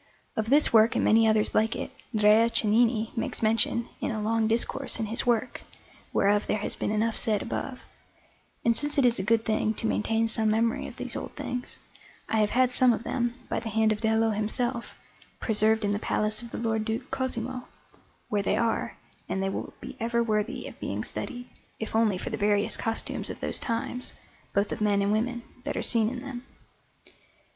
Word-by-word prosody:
Of 220 0 -1
this 290 0 +4
work 225 0 +6
and - - +2
many 225 +1 +5
others 215 -1 +2
like 220 +1 +2
it - - -5 0.2
Drea 215 +2 +5
Cennini 225 0 +2
makes 230 - -2
mention 225 +1 +2
in - - -2
a 220 - -2
long 220 +1 +1
discourse 240 +4 0
in 220 - 0
his 230 +3 -1
work, 240 +1 +1 0.5
whereof 205 +1 +2
there 215 - +1
has 210 - -1
been - - -2
enough 215 +1 +1
said 215 -2 +1
above; 255 -2 -5 0.8
and 230 0 +4
since 295 +4 0
it 275 - +4
is 240 -3 +3
a - - -1
good 225 +2 +2
thing 215 0 +1
to - - -4
maintain 225 +1 +1
some 220 -1 +1
memory 225 +2 +1
of - - -10
these - - -4
old - - -6
things, 250 0 -4 0.5
I 225 - 0
have 210 -1 +3
had 255 +1 +3
some 250 -1 +5
of 230 - -4
them, 240 -2 -1
by - - -1
the 225 0 -5
hand 220 0 +2
of 215 0 -2
Dello 220 0 +2
himself, 235 +3 -2 0.4
preserved 220 0 +2
in 205 - +1
the 205 - 0
Palace 215 0 +1
of 235 - -9
the - - -6
Lord 220 -2 0
Duke 225 +4 -4
Cosimo, 255 -1 -3 0.6
where 205 -1 0
they 195 - 0
are, 230 -1 -1 0.3
and - - -1
they 195 - 0
will - - -4
be - - -9
ever 235 +1 +1
worthy 215 +1 -1
of - - -11
being - - -3
studied, 245 -1 -5 0.3
if 220 - -4
only 220 -4 +3
for - - -5
the - - -2
various 205 0 +2
costumes 225 0 -3
of - - -6
those - - -1
times, 245 +1 -3 0.4
both 200 +1 0
of - - -4
men 205 -1 +2
and 200 - +1
women, 235 +3 -1 0.2
that 290 +2 -3
are - - -1
seen 225 -2 +2
in 250 0 -6
them. 260 -3 -7
225 Hz, 205 wpm, -27 LUFS, 215-235 Hz, 0.8 s, work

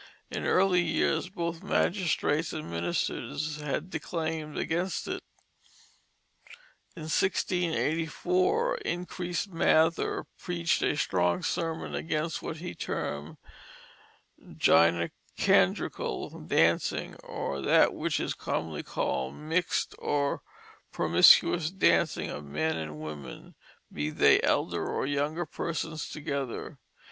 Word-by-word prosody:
In - - -3
early 185 -1 +4
years 165 +1 +1
both 170 -2 -4
magistrates 165 -4 +1
and 155 - -5
ministers 85 - -2
had 150 +4 -3
declaimed 160 -1 -3
against 175 +4 -1
it. - - -3 1.7
In 165 - -8
1684 180 - +1
Increase 180 - -3
Mather 165 -2 +2
preached 170 -2 0
a 145 - +1
strong 90 -9 +1
sermon 165 -2 -2
against 160 0 -2
what 160 - -5
he 175 +3 -6
termed 75 +2 -4 1.1
"Gynecandrical 85 +1 +1
Dancing 85 +1 +2
or 70 - -4
that - - +4
which - - -1
is - - -1
commonly 80 -2 -3
called 65 0 -2
Mixt 165 +3 -1
or 140 -1 0 0.5
Promiscuous 165 -3 +5
Dancing 190 +2 +2
of 75 - -6
Men 75 +3 -1
and 80 -1 -5
Women, 75 -3 -8 0.4
be 75 +1 -2
they - - +5
elder - - +1
or - - -1
younger 145 +5 -1
Persons 160 -1 -4
together." 140 -5 -4
155 Hz, 100 wpm, -29 LUFS, -, 1.7 s, Promiscuous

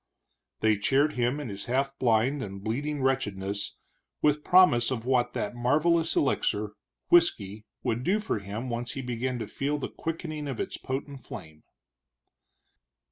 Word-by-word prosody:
They 110 -1 +4
cheered 135 +8 +3
him 125 +3 0
in 145 -5 -5
his 100 0 -3
half 135 +2 0
blind 125 +4 +2
and 100 -2 -6
bleeding 140 +6 -2
wretchedness 100 -7 -1 0.4
with 150 0 +2
promise 180 -11 +5
of 120 -3 -3
what 125 -2 +2
that - - -2
marvelous 155 +7 +2
elixir, 105 -7 +1 0.4
whisky, 110 - +3 0.2
would 115 +2 -1
do 195 +9 +2
for 210 - -1
him 105 +5 -5
once 120 0 -3
he 135 - -5
began 125 +1 -2
to 115 - -3
feel 140 +7 -2
the 140 - -4
quickening 155 -2 -4
of 135 -4 -4
its - - -3
potent 135 0 -5
flame. 80 -1 -9
130 Hz, 150 wpm, -28 LUFS, 110-145 Hz, 0.4 s, promise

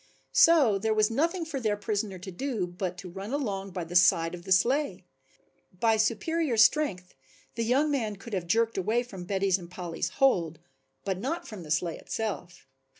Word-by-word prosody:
So 280 -12 +5
there 220 +2 0
was 215 +1 +3
nothing 330 +7 0
for 305 -4 -4
their 215 -4 0
prisoner 205 -1 -2
to 190 +2 -8
do 225 0 -2
but 180 0 -5
to 180 0 -8
run 195 +4 -7
along 200 -9 -2
by 180 -1 -4
the 170 +2 -8
side 170 -2 +4
of 175 0 -9
the 190 - -7
sleigh. 265 +10 +2 0.7
By 225 +1 +3
superior 240 +6 0
strength 215 - +3 0.4
the 230 - -2
young 270 +6 +2
man 225 -7 -1
could 210 +3 -11
have 180 -3 -2
jerked 225 +3 +1
away 225 +6 +1
from 195 -7 -9
Betty's 195 0 +1
and 170 -1 -11
Polly's 175 -2 -4
hold, 175 - +2 0.5
but 190 -2 -2
not 330 - -3
from 210 -4 -8
the 155 - -10
sleigh 165 +1 -1
itself. 185 -5 -5
205 Hz, 185 wpm, -28 LUFS, 180-245 Hz, 0.7 s, So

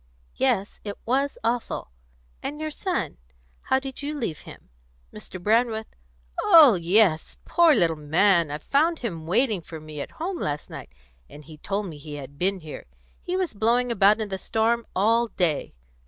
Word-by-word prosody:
"Yes, 230 -7 0
it 205 -1 -6
was 275 +4 0
awful. 230 - -2 0.5
And 295 +2 -5
your 310 0 -3
son 295 - -3 0.4
how 265 - +1
did 265 0 -6
you 295 +1 -4
leave 200 - -3
him? - - -13 0.4
Mr. 185 - -8
Brandreth 220 +3 +1 0.3
" 60 0 -36
"Oh 305 -7 +8
yes, 175 -1 +2
poor 335 -3 +5
little 170 -5 +2
man! 165 +3 +2
I 145 - -3
found 310 - +1
him 165 -7 -5
waiting 215 0 +1
for 160 0 -9
me 155 -1 -8
at - - -8
home 350 +2 -3
last 145 0 -4
night, - - -8 0.4
and 150 0 -13
he 155 -1 -13
told 200 +4 -2
me 160 -5 -8
he 150 0 -8
had 140 0 -10
been 190 +1 0
here. 155 - -9 0.3
He 360 +1 -2
was 370 -3 -1
blowing 235 +4 +1
about 210 0 +4
in 215 -2 -3
the 190 -1 -4
storm 230 +3 0
all 230 +5 +3
day. 170 - -1
210 Hz, 175 wpm, -25 LUFS, 160-250 Hz, 0.5 s, Oh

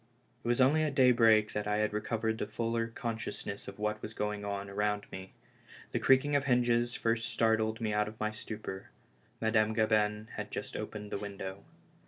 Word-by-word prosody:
It - - -5
was 120 +1 +2
only 140 +5 +5
at 150 -3 0
daybreak 115 -5 +5
that 105 0 -2
I 105 0 +1
had 105 0 +1
recovered 110 +1 -1
a - - -1
fuller 115 +1 -1
consciousness 115 -3 -5
of - - -8
what 105 0 -2
was 110 - -7
going 105 0 -2
on 100 -1 -3
around 105 +1 -1
me. 95 0 -8 0.6
The 120 - 0
creaking 135 +4 +4
of 140 -1 +2
hinges 120 -2 +2
first 115 0 0
startled 110 -1 +1
me 110 -2 -1
out 105 0 +2
of 110 +1 -9
my 110 0 0
stupor. 105 -3 -7 0.5
Madame 110 -1 +2
Gabin 110 0 +2
had - - -4
just - - -5
opened 105 -1 -5
the - - -2
window. 100 -1 -6
110 Hz, 185 wpm, -32 LUFS, 105-115 Hz, 0.6 s, only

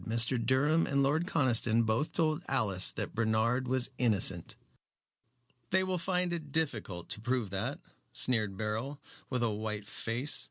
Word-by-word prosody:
Mr. 115 +1 +1
Durham 145 +7 +2
and 140 0 +2
Lord 155 +6 +1
Conniston 120 -7 +2
both 110 +7 0
told 155 -1 +1
Alice 105 -9 +3
that - - -4
Bernard 115 +3 +1
was 130 0 0
innocent." 100 -7 +2 1.1
"They 190 0 +3
will 185 -1 -1
find 180 0 -1
it 155 -4 -6
difficult 110 - -2
to 105 - -3
prove 120 -4 -1
that," 110 +9 -3 0.3
sneered 110 -6 0
Beryl, 110 +7 -3 0.3
with 125 -2 -1
a 115 - +1
white 105 -1 -4
face. 120 +8 -1
125 Hz, 150 wpm, -31 LUFS, 110-145 Hz, 1.1 s, Alice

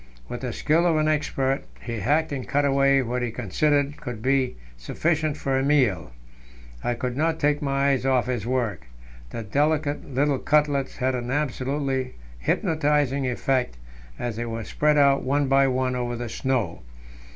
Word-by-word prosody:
With - - -6
the - - -3
skill 165 +3 +2
of 165 - +3
an 155 0 +2
expert, 135 -3 0 0.2
he 115 -2 -5
hacked 150 +10 +1
and 135 -3 -4
cut 145 +1 +1
away 140 -1 +3
what 125 +1 -2
he 120 - -1
considered 145 +6 0
would 120 -3 -6
be 130 -1 +1 0.2
sufficient 155 - -1
for 135 -1 0
a - - 0
meal. 130 - +2 0.7
I 120 - 0
could 125 +1 -3
not 160 +3 0
take 145 -1 +1
my 140 0 +1
eyes 135 -2 0
off 130 -2 +2
his 120 -3 -3
work; 110 - -2 0.4
the 115 - -5
delicate 145 +6 0
little 140 +1 +1
cutlets 145 -2 +1
had 130 0 0
an 120 -1 -3
absolutely 135 -1 -1 0.2
hypnotizing 145 - +1
effect 125 - 0 0.4
as 120 -3 -4
they 120 - -2
were 115 0 -4
spread 150 +6 +1
out 140 -1 +5
one 140 +2 +1
by 135 0 +4
one 130 0 0
over 120 -1 -2
the 120 0 -5
snow. 120 -8 -1
135 Hz, 170 wpm, -25 LUFS, 125-145 Hz, 0.7 s, out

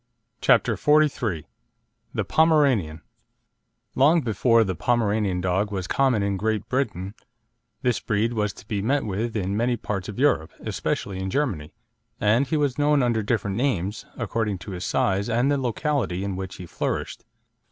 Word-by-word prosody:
CHAPTER - - +4
XLIII 140 - +2 0.7
THE - - -1
POMERANIAN 135 - +3 0.9
Long 155 +6 +4
before 115 0 +3
the 95 -3 -2
Pomeranian 105 -3 0
dog 95 +3 0
was 95 -3 -3
common 125 -2 +2
in 100 -1 -1
Great 110 +1 -1
Britain, 100 -8 -2 0.7
this 125 -2 +1
breed 110 +2 0
was 105 -2 0
to - - -15
be 105 -3 -2
met 135 +7 +1
with 110 +3 -3
in 100 0 -1
many 120 +2 +1
parts 100 -3 -4
of 105 - -7
Europe, 130 - +2
especially 95 -2 -3
in 95 0 -3
Germany; 95 - -2 0.4
and 115 +6 +3
he 155 - 0
was 145 -2 0
known 145 -2 +3
under 120 -2 +1
different 105 -2 -1
names, 105 -6 -1
according 110 -3 -1
to 95 +3 -9
his 90 0 -5
size 100 +1 0
and 125 +5 +2
the 145 - +2
locality 125 - -1
in 100 -2 -3
which 95 0 -6
he 90 - -8
flourished. - - -3
110 Hz, 160 wpm, -24 LUFS, 95-130 Hz, 0.9 s, CHAPTER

